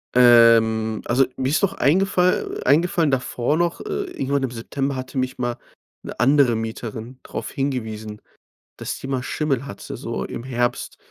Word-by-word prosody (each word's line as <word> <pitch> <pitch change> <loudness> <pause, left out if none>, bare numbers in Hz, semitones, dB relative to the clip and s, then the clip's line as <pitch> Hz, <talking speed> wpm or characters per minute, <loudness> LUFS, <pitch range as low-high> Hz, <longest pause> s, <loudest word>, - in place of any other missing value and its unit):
Ähm, 115 -3 +5
also, 130 +3 +3
mir 130 0 -1
ist 150 - +1
noch 195 0 +2
eingefall 180 +2 +1
eingefallen 160 +2 +3
davor 130 +2 0
noch, 170 0 0
äh, 410 -1 -3
irgendwann 140 0 -1
im 130 - -2
September 135 +4 -3
hatte 130 +1 -6
mich 130 0 -1
mal 120 -1 -2 0.5
'ne - - -8
andere 130 -1 +4
Mieterin 115 +2 -6
darauf - - -6
hingewiesen, 110 -6 -4 0.6
dass - - -4
die - - -7
mal 130 -2 -2
Schimmel 140 -2 -1
hatte, 100 - -8
so - - -4
im - - -6
Herbst. 120 -1 -2
130 Hz, 155 wpm, -22 LUFS, 115-140 Hz, 0.6 s, Ähm